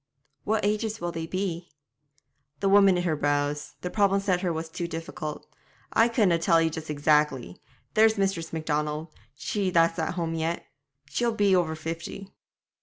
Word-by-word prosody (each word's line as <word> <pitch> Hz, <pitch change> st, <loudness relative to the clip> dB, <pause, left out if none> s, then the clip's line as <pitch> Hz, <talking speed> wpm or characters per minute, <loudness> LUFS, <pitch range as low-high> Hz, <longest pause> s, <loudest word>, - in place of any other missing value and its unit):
'What 215 Hz, -1 st, +1 dB
ages 215 Hz, +1 st, -1 dB
will 175 Hz, 0 st, -3 dB
they 165 Hz, -1 st, -5 dB
be?' 180 Hz, -2 st, -3 dB, 0.9 s
The 195 Hz, -, 0 dB
woman 195 Hz, -1 st, +6 dB
knit 175 Hz, -, 0 dB
her 165 Hz, -3 st, +1 dB
brows; 145 Hz, 0 st, -1 dB
the 180 Hz, -, -4 dB
problem 200 Hz, -2 st, +3 dB
set 190 Hz, -3 st, 0 dB
her 180 Hz, -3 st, 0 dB
was 160 Hz, 0 st, -3 dB
too 170 Hz, +2 st, -4 dB
difficult. 165 Hz, -2 st, -6 dB, 0.5 s
'I 225 Hz, -, +5 dB
couldna 205 Hz, -8 st, +3 dB
tell 165 Hz, 0 st, +4 dB
ye 165 Hz, 0 st, +2 dB
just 160 Hz, 0 st, -7 dB
exactly. 150 Hz, -, +1 dB, 0.3 s
There's 220 Hz, 0 st, +5 dB
Miss 190 Hz, -5 st, -1 dB
Macdonald 150 Hz, 0 st, -2 dB, 0.2 s
she 195 Hz, +6 st, -1 dB
that's 165 Hz, -1 st, +3 dB
at 160 Hz, +2 st, -1 dB
home 165 Hz, -2 st, -2 dB
yet; 165 Hz, +1 st, -2 dB, 0.4 s
she'll 235 Hz, +8 st, 0 dB
be 200 Hz, -3 st, +4 dB
over 165 Hz, -3 st, +1 dB
fifty.' 165 Hz, +5 st, -6 dB
170 Hz, 165 wpm, -27 LUFS, 160-195 Hz, 0.9 s, woman